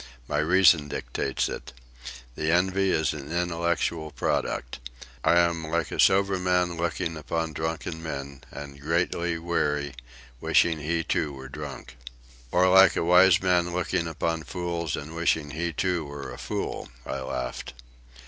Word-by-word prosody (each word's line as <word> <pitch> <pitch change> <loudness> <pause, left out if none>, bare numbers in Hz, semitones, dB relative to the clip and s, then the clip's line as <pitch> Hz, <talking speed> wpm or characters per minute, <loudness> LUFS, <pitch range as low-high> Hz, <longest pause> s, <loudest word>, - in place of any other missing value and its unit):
My - - 0
reason 85 -2 +5
dictates 65 0 -2
it. - - -7 0.6
The 80 +4 -1
envy 95 +2 +2
is 80 -4 +1
an 75 0 -8
intellectual 85 -2 -1
product. - - -2 0.4
I 85 - +4
am 85 -2 +2
like 85 -1 -1
a - - -5
sober 95 0 +4
man 90 -1 +1
looking 85 -1 -2
upon 80 +2 -3
drunken 80 +1 -3
men, 70 -4 -6
and, 70 -1 -9
greatly 85 +2 0
weary, 75 -4 -1 0.5
wishing 80 -2 +3
he, 80 +3 -1
too, 80 -5 -1
were 65 -1 -9
drunk." 70 -3 -8 0.5
"Or 90 +1 +4
like 95 +1 +7
a - - 0
wise 90 +2 +6
man 90 -2 +2
looking 90 -1 0
upon 80 0 -2
fools 85 -2 -3
and 80 +3 -7
wishing 80 -3 +1
he, 85 +3 -2
too, 90 +1 0
were 70 -2 -7
a - - -9
fool," 60 -1 -4 0.2
I - - -3
laughed. 65 -2 -5
80 Hz, 150 wpm, -26 LUFS, 75-85 Hz, 0.6 s, like